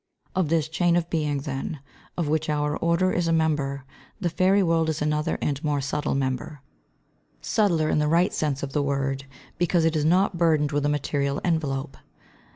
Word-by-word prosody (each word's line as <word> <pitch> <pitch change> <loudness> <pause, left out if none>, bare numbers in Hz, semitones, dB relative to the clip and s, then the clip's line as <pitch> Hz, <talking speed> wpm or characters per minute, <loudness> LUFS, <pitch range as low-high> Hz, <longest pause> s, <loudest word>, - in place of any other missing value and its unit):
] - - -39
Of 185 -5 +1
this 160 -2 +1
chain 170 +2 +1
of 170 -1 -1
Being, 150 -4 0
then, 140 +1 -4 0.4
of 170 -4 0
which 155 +1 0
our 150 0 0
order 170 +3 +1
is 175 -1 0
a - - +2
member, 145 -4 0 0.3
the 175 -4 -1
fairy 190 +3 +3
world 165 -2 +2
is 155 - -2
another 150 +2 0
and 145 +1 -2
more 150 -2 0
subtle 145 +2 -2
member, 135 +1 -3 0.8
subtler 175 -8 +1
in 155 - +2
the 150 - +1
right 170 +4 +3
sense 145 -3 -1
of 135 -1 -4
the 145 - +1
word 135 -1 -1 0.3
because 175 -1 +2
it 165 0 +1
is 150 - +1
not 180 +2 +2
burdened 155 -4 +3
with 145 0 0
a - - +1
material 140 -1 -1
envelope. 145 -5 -1
155 Hz, 190 wpm, -25 LUFS, 145-165 Hz, 0.8 s, fairy